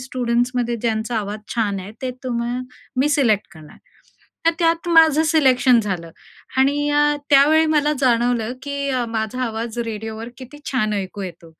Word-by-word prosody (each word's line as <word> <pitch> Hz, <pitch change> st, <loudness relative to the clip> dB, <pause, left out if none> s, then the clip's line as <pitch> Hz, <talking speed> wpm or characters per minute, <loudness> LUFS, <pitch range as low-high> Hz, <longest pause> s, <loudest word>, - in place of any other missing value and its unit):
स्टुडंट्समध्ये 245 Hz, -1 st, -1 dB
ज्यांचा 225 Hz, 0 st, -2 dB
आवाज 210 Hz, +1 st, -5 dB
छान 205 Hz, -4 st, 0 dB
आहे, 200 Hz, +3 st, -9 dB
ते 255 Hz, -, -1 dB
तुम्ह 240 Hz, 0 st, -2 dB, 0.4 s
मी 270 Hz, +3 st, +2 dB
सिलेक्ट 235 Hz, -8 st, +2 dB
करणार." 155 Hz, -1 st, -14 dB, 0.7 s
तर -, -, +7 dB
त्यात 335 Hz, 0 st, +1 dB
माझं 320 Hz, -2 st, +5 dB
सिलेक्शन 260 Hz, -6 st, +4 dB
झालं 180 Hz, -6 st, -4 dB, 0.5 s
आणि 285 Hz, +2 st, +2 dB
अ, 295 Hz, 0 st, +3 dB
त्यावेळी 305 Hz, +3 st, +5 dB
मला 300 Hz, -1 st, +2 dB
जाणवलं, 240 Hz, -2 st, +1 dB
की 280 Hz, -1 st, -3 dB
अ, 250 Hz, -2 st, 0 dB
माझा 225 Hz, +3 st, -3 dB
आवाज 230 Hz, 0 st, -4 dB
रेडिओवर 220 Hz, +1 st, -6 dB
किती 260 Hz, +3 st, -11 dB
छान 215 Hz, -5 st, 0 dB
ऐकू 200 Hz, 0 st, -4 dB
येतो. 170 Hz, -3 st, -9 dB
245 Hz, 150 wpm, -21 LUFS, 220-280 Hz, 0.7 s, तर